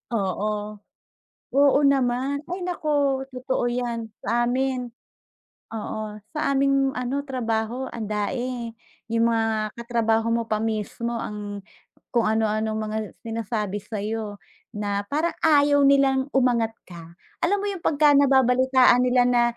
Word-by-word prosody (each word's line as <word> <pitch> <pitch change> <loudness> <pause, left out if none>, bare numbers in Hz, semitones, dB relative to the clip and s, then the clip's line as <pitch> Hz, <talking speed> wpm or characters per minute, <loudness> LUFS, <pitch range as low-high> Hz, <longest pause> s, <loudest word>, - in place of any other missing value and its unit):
Oo. 200 0 -1 1.0
Oo 280 +1 +5
naman. 270 0 +1
Ay, 360 +2 -4
naku! 290 -6 0
Totoo 255 0 -2
'yan 240 -2 -3 0.2
sa 240 +1 +1
amin. 255 0 -1 0.9
Oo, 215 -1 -5 0.2
sa 280 -2 +1
aming 275 0 +2
ano, 250 +3 -1
trabaho 235 0 -2
andami. 230 +3 -3 0.4
Yung 230 0 +3
mga 225 -1 0 0.2
katrabaho 225 -1 +1
mo 230 0 0
pa 215 - +1
mismo 225 +2 -2
ang 205 -1 -6 0.6
kung 235 - +4
ano-anong 220 0 0
mga 215 0 -3 0.3
sinasabi 225 -3 -3
sa'yo 210 0 -4 0.3
na 205 -2 -2
parang 315 +4 0
ayaw 285 -2 +5
nilang 275 -1 +3
umangat 240 -4 +2 0.2
ka. 170 -2 -11 0.3
Alam 400 +4 +2
mo - - -1
yung 375 -4 -7
pagka 295 -1 +4
nababalitaan 260 -2 +4
nila 250 0 +4
na 245 -1 +3
240 Hz, 125 wpm, -24 LUFS, 220-270 Hz, 1.0 s, Oo